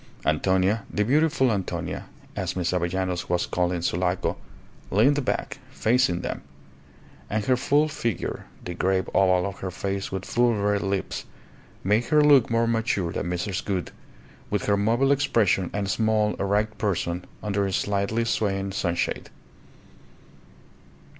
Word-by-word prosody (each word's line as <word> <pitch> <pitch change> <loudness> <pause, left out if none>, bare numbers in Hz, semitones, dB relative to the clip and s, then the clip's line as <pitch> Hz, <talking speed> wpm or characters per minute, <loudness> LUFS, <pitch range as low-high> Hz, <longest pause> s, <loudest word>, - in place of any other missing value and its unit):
Antonia, 95 +7 +2
the 105 - +1
beautiful 140 -1 +3
Antonia, 100 -4 -3 0.3
as - - -2
Miss 90 -2 0
Avellanos 90 0 -1
was 90 0 +1
called 90 0 0
in 85 -2 -2
Sulaco, 90 +1 0 0.5
leaned 135 +8 +3
back, - - -2
facing 110 -7 +2
them; - - -4 0.9
and 105 0 -1
her 130 - +4
full 145 +4 +2
figure, 115 - -3 0.2
the 90 - -4
grave 95 +1 0
oval 90 -2 +4
of 100 -2 -5
her 95 - -3
face 95 +2 -3
with 95 0 -4
full 120 -1 +2
red 100 0 +1
lips, 100 -1 -2 0.6
made 105 +5 +2
her 150 +1 +4
look 145 -5 +6
more 115 0 +2
mature 115 -6 0
than 85 - -3
Mrs. 90 +1 -2
Gould, 95 -3 -2 0.6
with 105 -2 -1
her 100 - +3
mobile 115 +7 +2
expression 115 -10 +2
and 100 -1 -2
small, 110 +1 +2
erect 105 +2 0
person 90 -4 -1 0.2
under 100 -1 0
a - - -3
slightly 100 +4 0
swaying 100 -3 0
sunshade. 85 -3 -1
100 Hz, 140 wpm, -25 LUFS, 95-115 Hz, 0.9 s, look